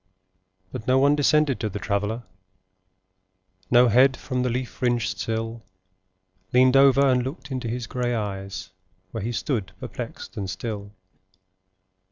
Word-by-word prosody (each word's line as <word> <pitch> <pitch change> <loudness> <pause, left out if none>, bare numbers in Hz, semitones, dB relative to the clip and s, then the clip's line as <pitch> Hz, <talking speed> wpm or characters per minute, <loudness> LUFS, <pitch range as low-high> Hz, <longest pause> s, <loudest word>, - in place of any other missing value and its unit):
But 120 -3 -7
no 130 +1 +4
one 140 +2 +5
descended 150 -1 +3
to 110 - -1
the 105 - -5
Traveller; 105 +3 -2 1.5
No 120 +1 +6
head 130 +4 +5
from 130 -2 -3
the 125 - +1
leaf 125 +1 -2
fringed 120 -2 0
sill 115 +1 -3 0.9
Leaned 130 +1 +5
over 140 0 +6
and 125 -1 +3
looked 135 +2 -6
into 130 -2 -3
his 120 +1 -3
grey 120 +1 -2
eyes, 100 -3 -5 0.4
Where 115 - -4
he 115 +4 -2
stood 110 - -2
perplexed - - -7
and 100 -2 -3
still. 100 +1 -5
120 Hz, 140 wpm, -24 LUFS, 110-130 Hz, 1.5 s, No